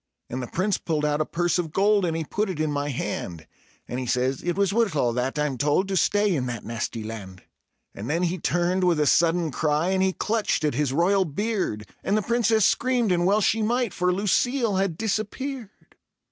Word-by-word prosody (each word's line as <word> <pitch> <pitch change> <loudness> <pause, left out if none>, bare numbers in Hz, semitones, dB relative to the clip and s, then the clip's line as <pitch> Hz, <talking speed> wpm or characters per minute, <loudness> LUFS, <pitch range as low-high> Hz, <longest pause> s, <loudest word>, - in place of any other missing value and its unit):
And 130 +2 -3
the 125 - -5
Prince 190 - -1
pulled 155 -3 -1
out 150 0 +1
a 155 - -1
purse 175 +1 0
of 165 -3 -3
gold, 200 +2 +3
and 165 -1 -1
he 165 - -2
put 205 +7 -2
it 175 -5 -4
in 155 -1 0
my 145 0 -2
hand; 85 - -4 0.4
And 125 - -4
he 130 - -4
says: 130 +2 0
"It 175 +1 -2
was 200 -1 +2
worth 225 -7 +1
all 120 -5 +1
that, 125 +4 -2
I'm 150 -4 -1
told, 150 +7 +2
to 195 - -1
stay 205 +2 +2
in 130 -4 -1
that 120 -3 -5
nasty 115 0 -4
land." 100 -4 -8 0.5
And 105 +4 -7
then 165 +4 0
he 180 +1 -1
turned 175 +3 0
with 175 -3 +3
a 150 - +3
sudden 165 +1 +3
cry, 155 +4 0
and 190 0 +1
he 190 0 +2
clutched 215 -5 -1
at 150 - +1
his 140 +1 0
royal 185 +7 +3
beard; 180 - -2 0.2
And 205 - +1
the 215 - 0
Princess 225 -2 +2
screamed, 245 -4 +2
and 175 0 +2
well 205 +2 +3
she 220 +2 +2
might 235 0 0
for 180 0 +1
Lucille 210 +3 +1
had 190 -4 0
disappeared. 225 +3 -3
175 Hz, 215 wpm, -25 LUFS, 145-205 Hz, 0.5 s, gold